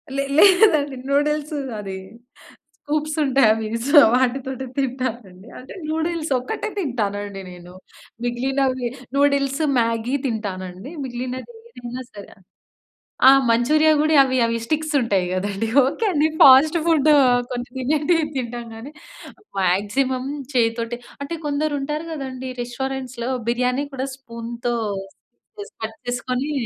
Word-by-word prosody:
లే 275 - 0
లేదండి 340 -8 +5
నూడిల్స్ 300 +2 0 0.3
అది 195 -2 -6 0.8
స్కూప్స్ 305 +1 -2
ఉంటాయి. 270 -3 +4
అవి 220 0 -3 0.2
సో 290 0 +8 0.2
వాటితోటి 260 +1 -1
తింటానండి. 240 -7 -4
అంటే 255 - -11 0.2
నూడిల్స్ 320 -1 -2
ఒక్కటే 430 - -4
తింటానండి 205 - -3
నేను. 180 0 -12 0.5
మిగిలినవి 255 +1 0 0.3
నూడిల్స్, 280 +1 +2 0.2
మ్యాగీ 230 +3 0
తింటానండి. 200 - -5
మిగిలినది 255 - -6 0.3
ఏదైనా 245 +1 -6
సరే 205 -1 -10
ఆ - - -23 0.9
ఆ! - - +11 0.2
మంచూరియా 305 +7 +4
కూడా 310 +1 +2
అవి 260 -1 0
అవి 230 0 -1
స్టిక్స్ 310 +3 -1
ఉంటాయి 200 -6 +1
కదండీ. 200 +3 -2 0.2
ఓకే 285 - -1
అండి. 305 -1 +2
ఫాస్టు 290 +5 +7
ఫుడు 310 -2 +4 0.4
కొన్ని 245 0 -4
తినేటివి 300 +5 +1
తింటాం 240 -1 -4
కానీ, 235 +6 -9 0.7
మాక్సిమం 210 +8 0 0.3
చేయితోటె 230 -1 0 0.3
అంటే 335 +4 -4
కొందరు 295 +1 -1
ఉంటారు 300 +3 -3
కదండీ. 260 -3 -5
రెస్టారెంట్స్‌లో 255 0 -4 0.2
బిర్యానీ 250 +3 0
కూడా 265 0 -3
స్పూన్‌తో 235 -1 -5 0.9
పీస్ 410 - -8
కట్ 220 0 -5
చేసుకొని 255 +3 -2
260 Hz, 115 wpm, -22 LUFS, 230-290 Hz, 0.9 s, ఆ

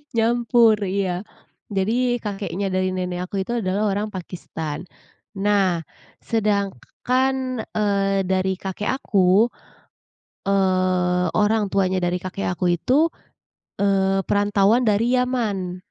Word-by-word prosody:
Nyampur, 230 -1 +4
iya 185 -1 -1 0.5
jadi. 240 +5 +1
Kakeknya 200 -3 -3
dari 185 0 0
nenek 180 -1 -3
aku - - -4
itu 235 - -6
adalah 200 +3 0
orang 205 +2 -1
Pakistan 170 -4 -6 0.5
nah 195 -4 +1 0.4
sedangkan, 235 - -1
eee, 200 -2 +1
dari 190 0 0
kakek 195 +3 -3
aku, 195 +1 +3 1.0
eee, 185 -2 +2
orang 215 0 +2
tuanya 190 -1 +2
dari 175 0 0
kakek 185 +1 -5
aku 175 -1 +1
itu, 285 - +2 0.7
eee, 195 -1 +1
perantauan 205 +3 +3
dari 230 +2 +2
Yaman. 220 -8 -1
195 Hz, 105 wpm, -22 LUFS, 185-220 Hz, 1.0 s, Nyampur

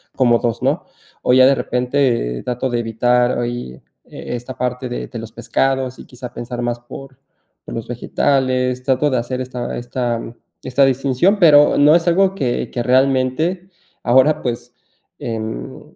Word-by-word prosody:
como 120 -3 +4
2, 120 -1 -2
¿no? - - 0 0.4
O - - +3
ya 130 0 +7
de 135 - +4
repente 125 - 0
eh, - - -10
trato 125 +1 -2
de 120 -1 -1
evitar 120 +2 +1
ahí, 120 - -4 0.3
eh, - - -7
esta 125 +2 -7
parte 125 +1 -2
de 120 - -5
de 120 - -7
los 110 0 -8
pescados 130 +3 -1
y - - -10
quizá 125 -1 -9
pensar 120 +1 -5
más 120 0 -2
por 135 +2 -11 0.5
por - - -8
los 115 - -5
vegetales, 125 +1 0
trato 135 +2 +1
de 130 - 0
hacer 125 +2 -3
esta 125 -1 -5
esta 120 -1 -2 0.4
esta 135 +2 +3
distinción, 135 +9 +2
pero 150 -5 +6
no 150 +2 +6
es 170 0 +1
algo 190 +2 +3
que 130 -9 -2
que 120 - -2
realmente 135 +8 +1 0.3
ahora 130 +5 +4
pues, 120 0 -4 0.5
em, 110 - -6
125 Hz, 165 wpm, -19 LUFS, 120-135 Hz, 0.5 s, ya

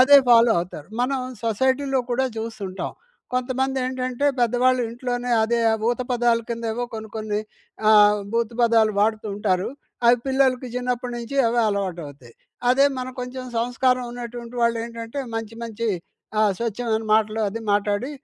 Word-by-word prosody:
అదే 280 +3 +8
ఫాలో 230 -1 +7
అవుతారు. 165 -4 -8
మనం 260 +2 0 0.2
సొసైటీలో 260 +4 +1
కూడా 265 +2 +1
చూస్తుంటాం. 205 -4 -5 0.4
కొంతమందేంటంటే, 255 0 -1
పెద్దవాళ్ళు 250 +2 +3
ఇంట్లోనే 245 +1 -3
అదే 235 +2 +1
ఆ - - +3 0.2
ఊత 245 - -2
పదాల 240 -1 +3
కిందేవో 230 +1 -2
కొన్ని 220 0 -6
కొన్ని 215 -1 -2 0.5
ఆహ్, 210 -1 +6
భూతు 230 0 0
పదాలు 225 -2 +4
వాడుతూ 215 +1 +1
ఉంటారు. 190 -3 0 0.4
అవి 240 +1 +6
పిల్లలకి 265 -1 +2
చిన్నప్పటి 250 0 -2
నుంచి 235 +4 -6
అవే 235 +1 +2
అలవాటవుతాయి. 165 - -4 0.4
అదే 275 +2 +5
మనం 255 0 -4
కొంచెం 255 +1 -6
సంస్కారం 250 +2 +1
ఉన్నటువంటి 240 0 -7
వాళ్ళేంటంటే, 230 +2 -2 0.2
మంచి 225 0 -5
మంచి 230 0 -3 0.5
ఆహ్, 215 -2 +4
స్వచ్ఛమైన 225 -1 -1
మాటలు 220 0 +1
అది 230 +2 -6
మాట్లాడి 205 +6 0
235 Hz, 135 wpm, -23 LUFS, 220-250 Hz, 0.5 s, అదే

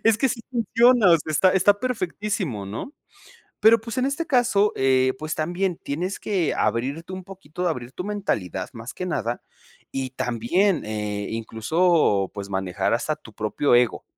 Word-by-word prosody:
Es 225 -1 +4
que 270 - +3
sí 230 - -4
funciona, 235 -2 +4
o 165 - +6
sea, 155 - -7
está 185 +5 +4
está 200 +2 +4
perfectísimo, 200 - -2
¿no? 110 - -6 0.7
Pero, 220 +1 +6
pues, 225 +1 -7
en 255 - +2
este 280 +4 -2
caso, 235 -6 +3
eh, 130 -1 +3
pues, 155 +1 -3
también 175 +3 -1
tienes 175 +7 -3
que 185 -7 0
abrirte 135 - -1
un 185 - -6
poquito, 180 -2 -5
abrir 125 -5 -4
tu 180 - -5
mentalidad 105 - -3
más 115 +1 -8
que 185 - -4
nada, 120 -8 -2 0.5
y 130 -1 -3
también, 130 - 0
eh, 105 -1 -3
incluso, 115 - +1
pues, 100 -1 -6
manejar 95 0 -1
hasta 155 +6 -1
tu 110 - -15
propio 110 +5 +1
ego. 120 -1 +1
160 Hz, 165 wpm, -24 LUFS, -, 0.7 s, o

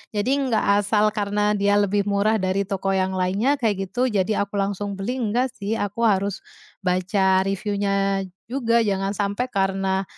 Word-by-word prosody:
Jadi, 210 +6 0 0.2
nggak 205 -2 +2
asal, 210 +1 +2
karena 205 0 0
dia 205 0 +2
lebih 200 0 +1
murah 205 +2 +2
dari 190 +1 0
toko 195 -1 -1
yang 190 0 0
lainnya, 195 +10 +1
kayak 200 -5 0
gitu, 250 +3 +1
jadi 200 0 +1
aku 205 - -10
langsung 200 0 -2
beli, 240 +6 -2
enggak 240 +3 0
sih. 205 +3 -3
Aku 205 +3 -2
harus 200 -1 0 0.4
baca 190 +1 +2
review-nya 195 0 0 0.3
juga, 235 -3 +2
jangan 195 -1 -1
sampai 205 +5 -1
karena, 195 -1 0
200 Hz, 160 wpm, -23 LUFS, 195-210 Hz, 0.4 s, nggak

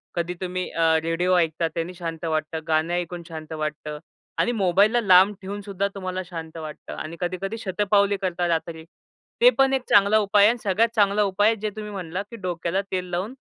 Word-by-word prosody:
कधी 170 +1 -1
तुम्ही 185 0 -3
अ, 165 - 0 0.2
रेडिओ 175 +2 +1
ऐकता 165 0 +1
त्यांनी 170 +2 -3
शांत 165 -2 -6
वाटतं, 155 0 -2
गाणं 160 +2 +1
ऐकून 175 0 -3
शांत 160 -1 -8
वाटतं 150 -1 -4 0.4
आणि 240 - +2
मोबाईलला 205 +3 +3
लांब 190 0 +6
ठेवूनसुद्धा 200 0 -3
तुम्हाला 185 -1 -4
शांत 165 -2 -8
वाटतं 155 -1 -8
आणि 165 +2 -7
कधी-कधी 185 +5 -3
शतपावली 200 0 +1
करता 180 -1 -1
रात्री. 165 -1 -2 0.6
ते - - +9
पण 270 0 +4
एक 265 - +1
चांगला 205 +1 +5
उपाय 205 0 +5
आहे. 240 +2 +2
सगळ्यात 215 +4 +2
चांगला 205 0 +3
उपाय 205 +2 +2
आहे 225 - +1
जे 215 - -1
तुम्ही 210 -1 -6
म्हणलात, 185 0 -4
की - - -7
डोक्याला 180 -1 -2
तेल 185 -1 -1
लावून 190 +8 -2
185 Hz, 185 wpm, -24 LUFS, 165-205 Hz, 0.6 s, ते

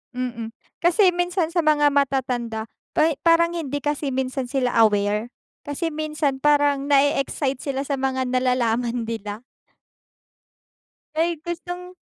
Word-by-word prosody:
Mm. 240 -3 -4 0.3
Kasi 360 +2 +4
minsan 350 -1 -1
sa 350 - +3
mga 295 -2 +3
matatanda 250 -5 0 0.3
pay 315 +1 +4
parang 335 0 +4
hindi 290 -5 -3
kasi 290 0 -2
minsan 260 -1 -2
sila 255 -2 0
aware. 210 +1 +2 0.3
Kasi 305 +3 -3
minsan 300 -3 -2
parang 290 -1 +3
na-e-excite 275 -1 +2
sila 275 -1 -3
sa 280 - -2
mga 260 -1 0
nalalaman 245 -2 +1
nila. 220 -1 -5 1.7
Ay 330 -1 0
gustong 355 +2 -6
280 Hz, 120 wpm, -23 LUFS, 250-315 Hz, 1.7 s, Kasi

